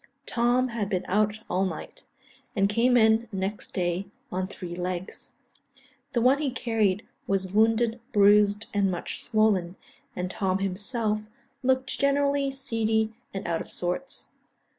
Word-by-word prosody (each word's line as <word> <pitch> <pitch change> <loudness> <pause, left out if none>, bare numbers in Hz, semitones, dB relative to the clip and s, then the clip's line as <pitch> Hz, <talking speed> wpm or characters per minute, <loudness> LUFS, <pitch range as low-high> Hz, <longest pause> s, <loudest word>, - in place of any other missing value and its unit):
Tom 245 +2 +2
had 220 -4 -2
been 185 -3 -1
out 210 +2 +1
all 185 +2 +1
night, 190 - -5 0.5
and 195 -1 +3
came 235 +4 +3
in 220 0 +4
next 195 +1 -3
day 180 +1 -1 0.2
on 185 +1 -1
three 180 -3 -7
legs; 180 0 -4 0.8
the 240 - +2
one 260 +4 +4
he 295 -2 0
carried 220 -6 0 0.2
was 190 -1 0
wounded, 225 +2 +3
bruised, 205 0 +5
and 200 -1 +2
much 175 -2 -3
swollen, 200 -5 +2 0.4
and 180 0 -3
Tom 190 -2 0
himself 210 +3 -1 0.4
looked 260 0 0
generally 280 0 +2
seedy 225 -5 0 0.2
and 195 - -5
out 165 -1 0
of - - -9
sorts. 180 +10 -3
210 Hz, 140 wpm, -27 LUFS, 190-235 Hz, 0.8 s, bruised